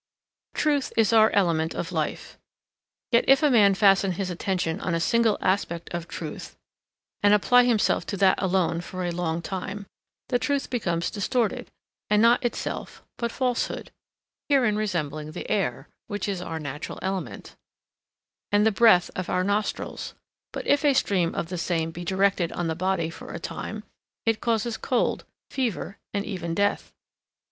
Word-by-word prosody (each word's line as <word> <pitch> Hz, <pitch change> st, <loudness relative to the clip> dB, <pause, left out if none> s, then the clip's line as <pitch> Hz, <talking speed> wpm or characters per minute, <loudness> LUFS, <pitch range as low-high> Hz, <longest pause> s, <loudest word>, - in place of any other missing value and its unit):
Truth 290 Hz, -3 st, +1 dB
is 225 Hz, -1 st, +4 dB
our 220 Hz, -1 st, +6 dB
element 170 Hz, -5 st, +1 dB
of -, -, -4 dB
life, -, -, -3 dB, 0.7 s
yet 235 Hz, 0 st, +5 dB
if 270 Hz, +3 st, +5 dB
a 295 Hz, -, +4 dB
man 205 Hz, -5 st, +5 dB
fasten 195 Hz, -1 st, +4 dB
his 185 Hz, +1 st, -3 dB
attention 180 Hz, -1 st, -2 dB
on 170 Hz, -, -1 dB
a -, -, 0 dB
single 230 Hz, +4 st, +2 dB
aspect 175 Hz, -3 st, -1 dB
of 170 Hz, -1 st, -4 dB
truth -, -, -7 dB, 0.6 s
and 205 Hz, 0 st, +6 dB
apply 245 Hz, +4 st, +5 dB
himself 230 Hz, -4 st, +2 dB
to 200 Hz, -, -3 dB
that 190 Hz, 0 st, +3 dB
alone 180 Hz, -3 st, +1 dB
for 185 Hz, +1 st, -5 dB
a 175 Hz, -, -1 dB
long 170 Hz, -1 st, -2 dB
time, 195 Hz, +3 st, -5 dB, 0.4 s
the 245 Hz, -, +2 dB
truth 280 Hz, +3 st, -1 dB
becomes 170 Hz, -8 st, -1 dB
distorted 220 Hz, +2 st, -1 dB, 0.4 s
and 210 Hz, -, +4 dB
not 235 Hz, +3 st, +5 dB
itself 240 Hz, -, -4 dB, 0.2 s
but 235 Hz, -1 st, -1 dB
falsehood; 250 Hz, -2 st, -2 dB, 0.6 s
herein 250 Hz, -7 st, +3 dB
resembling 155 Hz, -7 st, -3 dB
the -, -, -6 dB
air, 205 Hz, -3 st, -1 dB, 0.2 s
which 205 Hz, -2 st, -3 dB
is 195 Hz, -3 st, -2 dB
our 165 Hz, -2 st, -5 dB
natural 145 Hz, -1 st, -6 dB
element, 190 Hz, 0 st, -4 dB, 1.0 s
and 205 Hz, +1 st, +4 dB
the 220 Hz, -, +4 dB
breath 200 Hz, -4 st, +5 dB
of 185 Hz, -, -4 dB
our 180 Hz, -, +1 dB
nostrils, 205 Hz, +2 st, -2 dB, 0.4 s
but -, -, -6 dB
if 285 Hz, +1 st, +3 dB
a 285 Hz, -2 st, +4 dB
stream 180 Hz, -8 st, +1 dB
of 165 Hz, -, -3 dB
the 180 Hz, -1 st, -4 dB
same 165 Hz, -1 st, -1 dB
be 175 Hz, +2 st, -7 dB
directed 190 Hz, -1 st, +1 dB
on 175 Hz, -, -2 dB
the 165 Hz, -, 0 dB
body 175 Hz, -1 st, -1 dB
for -, -, -10 dB
a -, -, -5 dB
time, -, -, -6 dB, 0.4 s
it 225 Hz, -1 st, +1 dB
causes 230 Hz, -1 st, 0 dB
cold, 255 Hz, -, 0 dB, 0.3 s
fever, 230 Hz, -6 st, -3 dB
and 200 Hz, 0 st, -2 dB
even 170 Hz, -5 st, -4 dB
death. 205 Hz, +1 st, 0 dB
195 Hz, 165 wpm, -25 LUFS, 175-225 Hz, 1.0 s, our